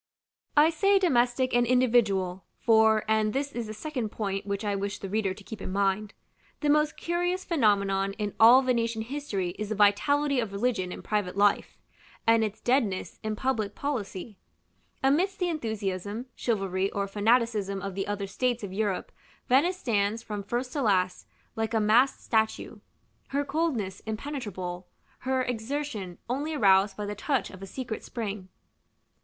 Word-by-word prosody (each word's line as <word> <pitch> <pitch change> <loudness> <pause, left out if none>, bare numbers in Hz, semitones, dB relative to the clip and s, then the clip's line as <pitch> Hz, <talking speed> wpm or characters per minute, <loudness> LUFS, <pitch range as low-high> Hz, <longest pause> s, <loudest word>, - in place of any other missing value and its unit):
I 305 +2 +7
say 390 +5 +3
domestic 255 -7 +2
and 240 0 +3
individual; 215 -7 +2 0.2
for 220 -1 +4
and 215 -1 +2
this 280 +1 -1
is 235 -4 -4
the 215 - -5
second 250 -2 -3
point 200 -2 -3
which 200 +1 -2
I 205 -1 0
wish 200 +1 -3
the 195 - -7
reader 200 -3 0
to 205 - -13
keep 220 +1 -9
in - - -5
mind 200 +1 0 0.5
the 295 -1 +3
most 300 0 +2
curious 355 +2 -1
phenomenon 200 - +2
in 210 -1 -3
all 240 +4 +8
Venetian 230 -3 0
history 225 -8 -3
is 210 -1 -3
the 215 - -1
vitality 275 +8 +3
of 225 -4 -2
religion 200 -4 -1
in - - -8
private 205 -3 -1
life, 205 0 +2 0.5
and 225 0 +5
its 215 -1 -4
deadness 240 -7 0
in 215 0 -2
public 220 -4 -1
policy. 220 -7 -4 0.6
Amidst 350 +9 +2
the 360 -1 0
enthusiasm, 215 - -3
chivalry, 195 -4 0
or 200 0 -2
fanaticism 210 -1 +1
of 195 0 -5
the 195 +1 -3
other 205 -1 -2
states 240 +4 -1
of 190 -2 -5
Europe, 200 -2 -1 0.4
Venice 295 +9 +3
stands, 220 - 0
from 210 -1 -4
first 240 +5 -3
to 290 - -1
last, 185 -5 +1 0.3
like 225 0 -1
a - - +4
masked 230 +6 +3
statue; 220 -1 0 0.5
her 285 +1 -1
coldness 270 - -1
impenetrable, 205 -8 -5 0.3
her 260 0 0
exertion 235 -6 -4
only 290 +6 -2
aroused 195 -4 +4
by 210 - -3
the 205 - -3
touch 260 +6 -1
of 185 - -12
a 195 - -7
secret 235 +1 -5
spring. 205 -5 -5
220 Hz, 160 wpm, -28 LUFS, 200-260 Hz, 0.6 s, all